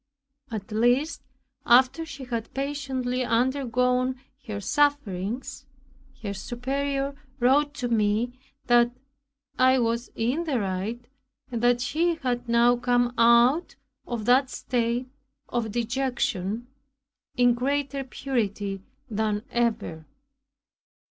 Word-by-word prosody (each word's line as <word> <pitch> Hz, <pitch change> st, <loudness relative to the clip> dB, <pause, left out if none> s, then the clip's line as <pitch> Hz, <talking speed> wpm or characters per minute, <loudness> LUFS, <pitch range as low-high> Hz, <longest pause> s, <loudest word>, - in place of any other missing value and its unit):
At 215 Hz, -1 st, -6 dB
last, 245 Hz, +8 st, +2 dB, 0.4 s
after 260 Hz, +7 st, +4 dB
she 275 Hz, -3 st, -8 dB
had 230 Hz, -3 st, -4 dB
patiently 265 Hz, -2 st, -2 dB
undergone 250 Hz, +1 st, +1 dB, 0.3 s
her 210 Hz, -2 st, -3 dB
sufferings, 250 Hz, -5 st, -1 dB, 0.6 s
her 200 Hz, -2 st, -3 dB
Superior 275 Hz, +6 st, -2 dB, 0.3 s
wrote 285 Hz, +4 st, +3 dB
to 250 Hz, -, -2 dB
me 220 Hz, +1 st, +1 dB, 0.3 s
that 240 Hz, -1 st, +5 dB, 0.7 s
"I 260 Hz, +1 st, +5 dB
was 235 Hz, 0 st, 0 dB
in 255 Hz, +9 st, 0 dB
the 280 Hz, -6 st, 0 dB
right, 205 Hz, +5 st, -3 dB, 0.4 s
and 235 Hz, -2 st, -2 dB
that 240 Hz, 0 st, +3 dB
she 330 Hz, +7 st, +1 dB
had 245 Hz, -5 st, -3 dB
now 235 Hz, +1 st, +4 dB
come 245 Hz, 0 st, +1 dB
out 235 Hz, +8 st, +4 dB, 0.3 s
of 235 Hz, -3 st, -3 dB
that 255 Hz, +2 st, +4 dB
state 240 Hz, 0 st, -1 dB, 0.4 s
of 230 Hz, -3 st, -2 dB
dejection, 235 Hz, -3 st, -1 dB, 0.7 s
in 245 Hz, -2 st, +5 dB
greater 275 Hz, +2 st, -1 dB
purity 210 Hz, -7 st, -2 dB, 0.3 s
than 215 Hz, -2 st, -1 dB
ever." 220 Hz, -9 st, -1 dB
245 Hz, 105 wpm, -26 LUFS, 230-265 Hz, 0.7 s, that